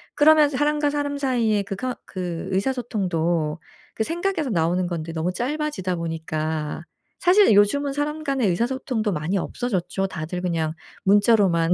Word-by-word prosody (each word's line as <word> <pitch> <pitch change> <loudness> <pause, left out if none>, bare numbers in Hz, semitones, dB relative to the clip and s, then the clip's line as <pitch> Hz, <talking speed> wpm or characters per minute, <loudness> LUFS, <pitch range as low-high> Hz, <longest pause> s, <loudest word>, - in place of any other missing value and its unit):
그러면서 300 -1 +5
사람과 295 0 +2
사람 285 -1 -2
사이에 235 -7 +1
그 195 - -5
커 255 +3 -3
그 180 -2 -5
의사소통도 180 -9 -1 0.4
그 220 - 0
생각에서 340 - -1
나오는 175 +1 +1
건데 165 -2 -4
너무 165 +3 -1
짧아지다 260 -7 -2
보니까 160 -1 -3 0.4
사실 375 - +5
요즘은 275 +8 +3
사람 300 +2 -2
간의 275 -6 +1
의사소통도 235 +2 -1
많이 170 +5 -1
없어졌죠. 195 -2 -2
다들 180 0 -5
그냥 165 -3 -1 0.3
문자로만 195 -4 +4
205 Hz, 345 characters per minute, -23 LUFS, 170-280 Hz, 0.4 s, 그러면서